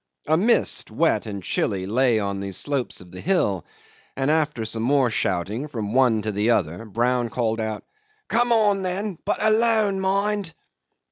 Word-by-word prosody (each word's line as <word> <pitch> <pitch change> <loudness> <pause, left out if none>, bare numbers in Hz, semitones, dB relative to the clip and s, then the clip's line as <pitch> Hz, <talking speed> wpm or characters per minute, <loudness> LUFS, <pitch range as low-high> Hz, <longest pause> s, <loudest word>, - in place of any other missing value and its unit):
A 155 - +3
mist, 215 +8 +2
wet - - +1
and 100 -3 -6
chilly, 95 +1 -1
lay 120 +3 +2
on 100 -2 -2
the 100 0 -5
slopes 140 0 -2
of 90 -1 -15
the 90 - -9
hill, 105 - +1 0.5
and 135 +2 +1
after 150 -7 0
some 110 +1 -4
more 130 0 +2
shouting 105 - -1
from 110 -7 -4
one 120 -5 +3
to 110 - -1
the 105 +3 0
other, 90 -2 0
Brown 120 +3 0
called 115 -1 -1
out, 110 -1 -3 0.4
"Come 240 +1 +2
on, 210 -4 +3
then, 190 0 -3
but 205 - 0
alone, 215 -2 +3
mind!" 195 -2 -1
125 Hz, 165 wpm, -23 LUFS, -, 0.5 s, A